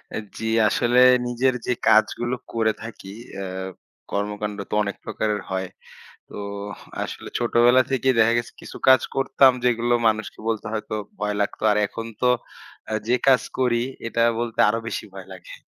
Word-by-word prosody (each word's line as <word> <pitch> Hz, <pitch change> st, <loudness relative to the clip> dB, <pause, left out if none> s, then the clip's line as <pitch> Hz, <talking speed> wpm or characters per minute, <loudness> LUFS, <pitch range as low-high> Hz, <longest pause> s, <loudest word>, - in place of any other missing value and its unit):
আ -, -, -2 dB, 0.2 s
জী, 110 Hz, 0 st, -3 dB, 0.2 s
আসলে 120 Hz, +1 st, +3 dB, 0.3 s
নিজের 125 Hz, +2 st, +1 dB
যে 125 Hz, -, +1 dB, 0.2 s
কাজগুলো 120 Hz, +3 st, +3 dB, 0.2 s
করে 110 Hz, -1 st, +1 dB
থাকি 105 Hz, -4 st, -9 dB, 0.3 s
আ -, -, -4 dB, 0.7 s
কর্মকান্ড 105 Hz, 0 st, -3 dB
তো -, -, -6 dB
অনেক 100 Hz, -1 st, -4 dB
প্রকারের 105 Hz, -2 st, -2 dB
হয়। 95 Hz, -1 st, -3 dB, 0.6 s
তো -, -, -9 dB, 0.7 s
আসলে -, -, -7 dB
ছোটবেলা 120 Hz, +1 st, +4 dB
থেকেই 130 Hz, -1 st, +2 dB
দেখা 110 Hz, +1 st, +5 dB
গেছে 120 Hz, -, -3 dB
কিছু -, -, -9 dB
কাজ 130 Hz, -2 st, +7 dB
করতাম, 135 Hz, 0 st, +5 dB
যেগুলো 120 Hz, 0 st, +2 dB
মানুষকে 110 Hz, -1 st, -1 dB
বলতে 110 Hz, -1 st, -2 dB
হয়তো 110 Hz, -1 st, -3 dB, 0.2 s
ভয় 105 Hz, 0 st, -1 dB
লাগত। 100 Hz, -, -2 dB
আর 105 Hz, -, +2 dB
এখন 115 Hz, -, -7 dB, 0.2 s
তো 125 Hz, -, +4 dB, 0.6 s
আ -, -, -1 dB
যে 120 Hz, -, +4 dB
কাজ 130 Hz, -2 st, +6 dB, 0.2 s
করি 120 Hz, -2 st, +2 dB, 0.3 s
এটা 115 Hz, 0 st, +1 dB, 0.2 s
বলতে 120 Hz, -1 st, -4 dB
আরো 115 Hz, +2 st, 0 dB
বেশি -, -, -4 dB
ভয় 95 Hz, -1 st, -10 dB
লাগে। 90 Hz, -2 st, -11 dB
115 Hz, 160 wpm, -23 LUFS, 105-120 Hz, 0.7 s, কাজ